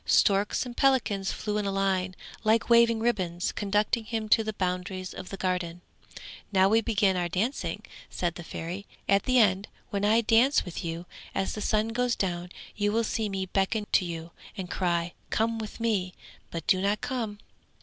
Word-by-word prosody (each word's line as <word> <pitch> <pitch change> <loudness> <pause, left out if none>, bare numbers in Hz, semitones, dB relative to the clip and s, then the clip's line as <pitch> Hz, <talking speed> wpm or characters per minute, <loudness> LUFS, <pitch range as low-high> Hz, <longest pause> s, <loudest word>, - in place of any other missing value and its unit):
Storks 200 +4 +3
and 245 -1 -7
pelicans 235 -8 +2
flew 210 0 -2
in 205 - -1
a - - 0
line 190 -1 0 0.3
like 225 +2 +2
waving 235 -1 +6
ribbons, 185 -7 0
conducting 210 +3 0
him 220 -1 -3
to 220 +1 +5
the 215 - -2
boundaries 185 0 -3
of 185 - -8
the 195 - -6
Garden. 180 -2 -2 0.7
'Now 190 -1 +5
we 225 +2 +4
begin 205 -4 +2
our 175 -1 0
dancing!' 215 - -2 0.2
said 175 -2 -1
the 175 - -8
Fairy; 175 +5 -6 0.2
'at 195 0 +3
the 255 0 +3
end 200 -3 +4 0.2
when 200 0 -1
I 220 +3 +4
dance 235 +5 +4
with 180 - -6
you, 165 +1 -4 0.3
as 190 - 0
the 210 - -5
sun 215 +1 +1
goes 245 +1 +1
down 175 -2 -2 0.2
you 205 0 +1
will 230 +2 +2
see 220 -1 -1
me 190 -1 -2
beckon 195 +3 0
to - - +4
you 165 -1 -5 0.3
and 185 -2 -5
cry, 175 -2 0 0.2
"Come 225 +1 0
with 215 0 -7
me", 205 -6 0 0.3
but 165 -2 -5
do 185 - +3
not 200 +2 +1
come. 230 -5 -3
200 Hz, 185 wpm, -28 LUFS, 185-225 Hz, 0.7 s, waving